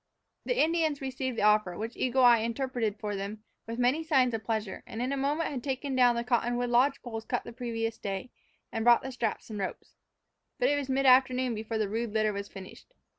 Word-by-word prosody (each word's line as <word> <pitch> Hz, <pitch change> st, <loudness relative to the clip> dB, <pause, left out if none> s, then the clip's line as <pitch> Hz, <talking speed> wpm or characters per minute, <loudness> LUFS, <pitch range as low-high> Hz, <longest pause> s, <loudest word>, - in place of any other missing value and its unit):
The -, -, 0 dB
Indians 315 Hz, -2 st, +2 dB
received 260 Hz, -2 st, -4 dB
the -, -, 0 dB
offer, 210 Hz, -4 st, +3 dB
which 225 Hz, +2 st, -5 dB
Eagle 255 Hz, +1 st, +1 dB
Eye 240 Hz, -2 st, +7 dB
interpreted 230 Hz, -2 st, -2 dB
for 210 Hz, -1 st, -4 dB
them, 200 Hz, +2 st, -5 dB, 0.2 s
with 230 Hz, +1 st, -5 dB
many 250 Hz, +6 st, +2 dB
signs 265 Hz, -6 st, +3 dB
of 220 Hz, -1 st, -3 dB
pleasure; 220 Hz, -4 st, -3 dB
and 225 Hz, -, -7 dB
in 250 Hz, +2 st, -1 dB
a -, -, 0 dB
moment 290 Hz, +4 st, -1 dB
had 255 Hz, -4 st, -5 dB
taken 270 Hz, 0 st, -2 dB
down 245 Hz, -2 st, +5 dB
the 235 Hz, -, -1 dB
cottonwood 240 Hz, 0 st, 0 dB
lodge 265 Hz, +4 st, +3 dB
poles 225 Hz, -3 st, -5 dB
cut 245 Hz, -, -2 dB
the -, -, -9 dB
previous 230 Hz, -2 st, -3 dB
day, 195 Hz, +4 st, -4 dB, 0.4 s
and 225 Hz, -, -2 dB
brought 240 Hz, +2 st, +5 dB
straps 230 Hz, -2 st, -3 dB
and 210 Hz, -, -5 dB
ropes. 190 Hz, -, -5 dB, 0.6 s
But 250 Hz, -2 st, +2 dB
it 290 Hz, -, +3 dB
was 285 Hz, -2 st, -3 dB
mid 270 Hz, +1 st, +1 dB
afternoon 255 Hz, -1 st, +4 dB
before 220 Hz, +1 st, -3 dB
the 215 Hz, -1 st, 0 dB
rude 225 Hz, +1 st, -3 dB
litter 215 Hz, -1 st, +1 dB
was 200 Hz, 0 st, -5 dB
finished. 195 Hz, -, -12 dB
240 Hz, 215 wpm, -29 LUFS, 220-260 Hz, 0.6 s, Eye